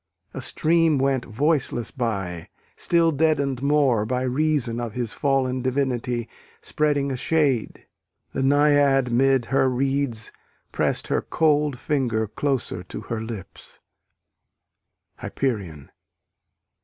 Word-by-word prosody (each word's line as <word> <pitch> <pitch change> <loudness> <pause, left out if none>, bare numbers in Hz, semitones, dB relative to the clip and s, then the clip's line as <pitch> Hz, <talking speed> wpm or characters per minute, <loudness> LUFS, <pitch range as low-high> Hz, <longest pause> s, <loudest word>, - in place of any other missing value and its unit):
A - - -5
stream 165 -1 +2
went 135 -2 0
voiceless 130 -2 0
by, 95 - -3 0.3
still 170 -1 +2
deadened 140 -4 +1
more 140 -6 +2
By 125 +3 -1
reason 130 -3 0
of 120 -3 -4
his 120 -2 -3
fallen 130 -2 0
divinity 125 -2 -1 0.3
Spreading 145 -2 0
a - - -2
shade: 140 -3 0 0.5
the - - -2
Naiad 140 -2 +3
'mid 135 0 +3
her 135 -1 +3
reeds 135 -3 -1 0.4
Press'd - - -1
her - - +1
cold 150 -3 +1
finger 125 -5 0
closer 125 -4 -2
to 90 - -8
her 115 -1 -4
lips. 110 -4 -8 1.4
_Hyperion. 95 - -3
130 Hz, 110 wpm, -23 LUFS, 120-145 Hz, 1.4 s, Naiad